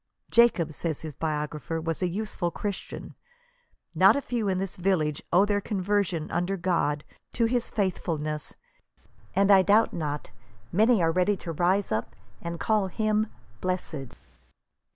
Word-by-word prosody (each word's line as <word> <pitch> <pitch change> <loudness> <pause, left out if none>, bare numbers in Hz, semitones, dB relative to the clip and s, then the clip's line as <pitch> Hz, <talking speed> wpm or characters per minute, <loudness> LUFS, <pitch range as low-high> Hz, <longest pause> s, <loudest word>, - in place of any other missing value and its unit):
"Jacob," 230 -9 +4
says 160 -1 -3
his 155 -2 -6
biogra 150 0 -3
pher, 165 -1 -3
" - - -9
was 165 +1 -2
a 180 - +2
useful 195 -2 -2
Christian. 200 +3 -5 0.8
Not - - +6
a 280 - 0
few 235 -4 -1
in 190 -1 +1
this 195 0 -3
village 175 -6 0
owe 185 +4 +5
their 205 -1 +1
conversion, 195 -5 -1
under 180 +3 0
God, 165 -5 0 0.3
to 230 - +2
his 240 +1 0
faithfulness; 155 -6 -2 0.8
and 200 +1 +4
I 195 -1 +8
doubt 210 +4 +4
not 150 -3 -4 0.4
many 220 0 +4
are 165 - +3
ready 185 +4 +2
to 170 - -2
rise 180 +5 +1
up 110 +1 -2 0.3
and 170 0 -5
call 215 -3 +2
him 215 +3 0 0.3
blessed." 170 -7 -3
185 Hz, 150 wpm, -27 LUFS, 160-205 Hz, 0.8 s, I